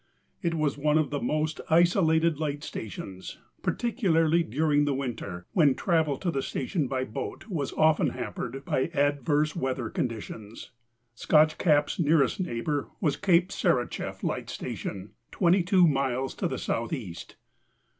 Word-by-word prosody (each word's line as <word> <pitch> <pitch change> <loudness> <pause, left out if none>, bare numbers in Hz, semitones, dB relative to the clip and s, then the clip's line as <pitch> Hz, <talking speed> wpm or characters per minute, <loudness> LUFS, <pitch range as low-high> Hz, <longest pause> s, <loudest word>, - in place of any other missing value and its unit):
It 170 -3 0
was 150 -3 0
one 150 +1 +3
of 155 -2 +1
the 145 - -2
most 155 +1 -1
isolated 165 -2 +3
light 145 -2 -2
stations, 95 -6 -7 0.2
particularly 170 -8 +2
during 145 +1 +1
the 145 -2 0
winter 110 -10 -5
when 145 -7 +4
travel 160 -6 +1
to 175 +2 -2
the 135 - -1
station 140 +3 -2
by 130 0 -1
boat 110 - -6
was 150 -8 -2
often 155 0 +3
hampered 135 +3 -5
by 130 - 0
adverse 145 +2 +1
weather 130 -7 -2
conditions. 110 -2 -5 0.4
Scotch 155 +5 +3
CapŌĆÖs 150 -4 +2
nearest 150 -3 +3
neighbor 145 -3 -2
was 150 -7 +1
Cape 180 -2 +3
Sarichef 130 -12 -1
Light - - -2
Station, 95 +1 -6 0.2
22 180 0 +4
miles 135 -2 0
to - - -2
the - - -3
southeast. 115 - -4
145 Hz, 135 wpm, -27 LUFS, 130-165 Hz, 0.4 s, when